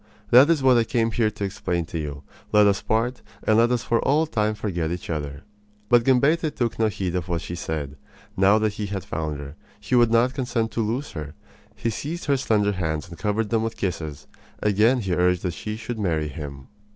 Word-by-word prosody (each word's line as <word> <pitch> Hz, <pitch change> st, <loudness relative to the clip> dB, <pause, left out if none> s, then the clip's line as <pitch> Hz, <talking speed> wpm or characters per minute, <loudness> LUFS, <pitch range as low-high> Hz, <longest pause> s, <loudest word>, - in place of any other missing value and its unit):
That 130 Hz, +5 st, +8 dB
is 160 Hz, -5 st, +2 dB
what 130 Hz, -2 st, +6 dB
I -, -, +3 dB
came 115 Hz, -2 st, 0 dB
here 110 Hz, -1 st, +2 dB
to 105 Hz, -1 st, -7 dB
explain 90 Hz, -3 st, -2 dB
to 85 Hz, 0 st, -5 dB
you. 75 Hz, -2 st, -5 dB, 0.3 s
Let 105 Hz, 0 st, +6 dB
us 100 Hz, -1 st, +2 dB
part, 120 Hz, +3 st, 0 dB, 0.2 s
and 110 Hz, +1 st, +4 dB
let 120 Hz, +1 st, +4 dB
us 125 Hz, -1 st, 0 dB
for 115 Hz, -, +1 dB
all 155 Hz, +3 st, +3 dB
time 110 Hz, -7 st, 0 dB
forget 90 Hz, -7 st, -2 dB
each 85 Hz, 0 st, -4 dB
other." 75 Hz, -2 st, -4 dB, 0.5 s
But 120 Hz, -1 st, +5 dB
Gambetta 150 Hz, +5 st, +3 dB
took 120 Hz, -6 st, -2 dB
no 110 Hz, -, +4 dB
heed 95 Hz, -4 st, -3 dB
of 90 Hz, -2 st, -3 dB
what 85 Hz, -2 st, -1 dB
she -, -, -6 dB
said. 75 Hz, -4 st, -4 dB, 0.4 s
Now 100 Hz, +2 st, +5 dB
that 110 Hz, -1 st, 0 dB
he 105 Hz, 0 st, -4 dB
had 100 Hz, -1 st, -4 dB
found 75 Hz, -2 st, -3 dB
her, 70 Hz, 0 st, -8 dB, 0.3 s
he 105 Hz, +4 st, -6 dB
would 120 Hz, -2 st, +5 dB
not 120 Hz, +3 st, +3 dB
consent 125 Hz, -4 st, -1 dB
to 115 Hz, -, -1 dB
lose 120 Hz, +7 st, -2 dB
her. 75 Hz, -2 st, -7 dB, 0.4 s
He 115 Hz, -, -2 dB
seized 155 Hz, -, -5 dB
her 140 Hz, -2 st, +2 dB
slender 105 Hz, -5 st, +2 dB
hands 80 Hz, -6 st, -2 dB
and 85 Hz, -, -10 dB
covered 105 Hz, +1 st, -1 dB
them 115 Hz, -1 st, +2 dB
with 115 Hz, 0 st, -3 dB
kisses. 80 Hz, -7 st, -4 dB, 0.4 s
Again 110 Hz, +5 st, +3 dB
he 95 Hz, -4 st, -1 dB
urged 90 Hz, 0 st, +2 dB
that 90 Hz, -2 st, -1 dB
she 105 Hz, +5 st, -5 dB
should 115 Hz, 0 st, -5 dB
marry 80 Hz, -6 st, 0 dB
him. 70 Hz, -2 st, -8 dB
105 Hz, 220 wpm, -24 LUFS, 85-115 Hz, 0.5 s, That